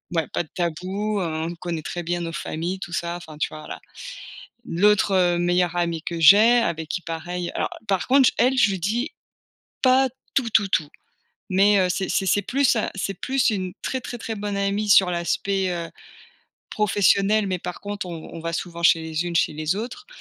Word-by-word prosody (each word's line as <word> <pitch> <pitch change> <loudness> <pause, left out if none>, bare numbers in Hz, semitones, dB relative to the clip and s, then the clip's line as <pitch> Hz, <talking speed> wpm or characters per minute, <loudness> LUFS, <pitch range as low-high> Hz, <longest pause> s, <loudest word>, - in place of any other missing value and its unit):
ouais, 165 -2 +1
pas - - 0
de 155 - -20
tabou, 185 +5 -2
hein. 160 -3 -2
On 175 - -8
connaît 170 -2 -4
très 175 +3 -5
bien 175 +1 -2
nos 165 -1 -4
familles, 165 +4 -4
tout 175 -2 -7
ça, 170 0 -2
enfin 160 -3 -11
tu - - -1
vois? 155 - -9
Voilà. - - -8 0.8
L'autre, 205 +3 +3
heu, 175 -2 +3
meilleure 175 0 +1
amie 170 -2 -1
que 170 -1 -4
j'ai, 210 +8 +7
avec 160 -8 -2
qui 180 +3 -2
pareil 175 +1 -4
alors, - - -1 0.2
par 195 -2 0
contre 265 0 +5
j - - +2
elle, 260 +2 +3
je 220 -5 +4
lui 190 - -3
dis 230 - -1 0.7
pas, 260 +1 +5 0.3
tout, 245 -4 +1
tout, 210 -1 +3
tout. 155 -5 0 0.6
Mais 200 +2 +4
heu, 185 -1 +3
c'est 185 +1 -2
c'est 190 - 0
c'est 205 +2 +2
plus 260 +4 +2
à 220 - -1
c'est 195 0 -3
plus 260 +8 0
une 190 -5 -1
très, 260 -1 -3
très, 240 - -6
très 225 - -5
bonne 205 -1 -4
amie 200 +1 0
sur 190 -2 +6
l'aspect, 185 +2 -1
heu, 170 -1 -3 0.8
professionnel. 205 0 +2
Mais 185 -1 -1
par 180 +1 -7
contre, 205 -1 -5
on 165 -2 -8
on 165 - -7
va 165 +1 -4
souvent 170 0 -5
chez 170 -1 +5
les 160 +1 -3
unes 175 - -4
chez - - +2
les 155 +3 -1
autres. 250 - -6
185 Hz, 210 wpm, -23 LUFS, 170-205 Hz, 0.8 s, j'ai